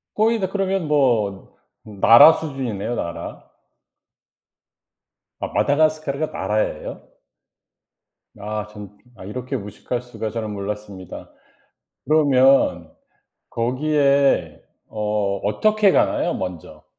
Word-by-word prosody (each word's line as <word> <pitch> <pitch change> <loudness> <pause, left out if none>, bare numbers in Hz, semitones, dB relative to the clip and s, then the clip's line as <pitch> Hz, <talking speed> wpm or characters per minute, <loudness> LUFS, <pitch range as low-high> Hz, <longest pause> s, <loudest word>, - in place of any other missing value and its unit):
거의 225 +1 +2
다 190 - -1
그러면 195 -4 -1
뭐 120 -10 0 0.3
나라 115 +8 +7
수준이네요 125 -7 -4
나라. 85 - -6 2.0
아 - - -3
마다가스카르가 155 0 +1
나라예요? 105 -7 -3 1.3
아 105 0 -4
참 105 -1 -12 0.2
아 95 - -12
이렇게 125 +5 -5
무식할 105 +4 -5
수가. 120 -3 -6
저는 110 -2 -4
몰랐습니다. 100 -2 -7 0.7
그러면 135 - +3 0.6
거기에 140 +3 +1 0.3
어 105 -2 -1
어떻게 205 - +2
가나요 - - +1
먼저. 90 -3 -7
120 Hz, 215 characters per minute, -21 LUFS, 105-150 Hz, 2.0 s, 나라